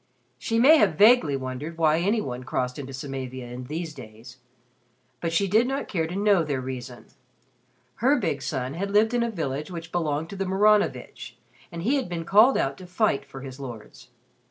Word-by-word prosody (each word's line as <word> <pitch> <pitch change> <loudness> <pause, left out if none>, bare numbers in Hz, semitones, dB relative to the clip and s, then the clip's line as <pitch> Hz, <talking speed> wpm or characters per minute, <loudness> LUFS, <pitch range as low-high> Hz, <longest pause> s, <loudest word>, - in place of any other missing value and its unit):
She 225 - -1
may 280 +7 +7
have - - +3
vaguely 210 - +5
wondered 130 +5 -6
why 160 -1 +3
any 205 +5 +1
one 125 -4 -5
crossed 125 +1 -3
into 135 -1 -7
Samavia 130 -2 -6
in 125 +1 -7
these 155 +3 -5
days. 120 -1 -12 0.8
But 165 - -2
she 195 +4 +1
did 220 +6 +3
not 270 +1 -3
care 165 -4 -1
to 175 - -6
know 200 -3 +3
their 145 -4 -2
reason. 125 -1 -7 0.9
Her 265 +6 +3
big 160 - -2
son 130 0 -3
had 195 +5 -3
lived 215 +3 +3
in 240 - +1
a 235 - 0
village 150 -7 -4
which 165 -2 -8
belonged 160 -2 -2
to - - -6
the 195 0 -2
Maranovitch 190 - +1 0.3
and 170 0 -6
he 265 +8 +2
had 260 -8 -3
been 170 -2 -4
called 215 +9 +5
out 135 0 -1
to 185 - -10
fight 180 -6 +1
for 135 -1 -10
his 130 0 -9
lords. 110 - -10
160 Hz, 195 wpm, -25 LUFS, 130-200 Hz, 0.9 s, may